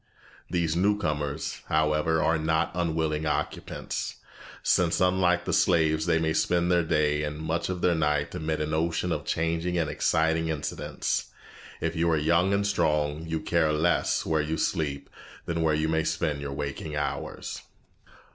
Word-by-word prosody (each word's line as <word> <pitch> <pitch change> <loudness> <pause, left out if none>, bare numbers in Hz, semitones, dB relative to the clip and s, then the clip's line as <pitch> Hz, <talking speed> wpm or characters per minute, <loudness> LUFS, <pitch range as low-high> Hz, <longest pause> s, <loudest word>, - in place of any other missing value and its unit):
These 85 -2 0
new 100 +4 +3
comers, 75 -4 -3
however, 80 +1 +2
are 80 -1 +2
not 80 +1 +1
unwilling 80 -3 -1
occupants, 75 - -3 0.5
since 85 -2 +2
unlike 90 -1 +2
the - - -1
slaves 80 -2 +3
they 85 -1 +3
may 80 -1 +1
spend 85 +2 +1
their 90 -1 +4
day 75 -2 +1
and 75 -1 -3
much 80 +3 -2
of 90 -1 -3
their 90 - +3
night 75 -2 0
amid 80 0 -2
an 75 +1 -2
ocean 85 +2 0
of 75 -3 -2
changing 85 +2 -1
and 80 -2 +1
exciting 80 0 +1
incidents. 80 -3 -2 0.5
If 80 0 -1
you 85 +1 +2
are 80 - +3
young 85 +5 +2
and 100 0 +1
strong, 75 -5 0
you 80 -1 -2
care 85 -2 +2
less 80 +3 +1
where 80 -1 +1
you 80 +2 -2
sleep 70 -3 -1 0.4
than 85 -1 -1
where 80 -1 +2
you 80 +1 0
may 80 0 +1
spend 75 -4 -1
your 70 -1 -4
waking 70 +2 -4
hours. 75 0 -4
80 Hz, 165 wpm, -27 LUFS, 75-85 Hz, 0.5 s, their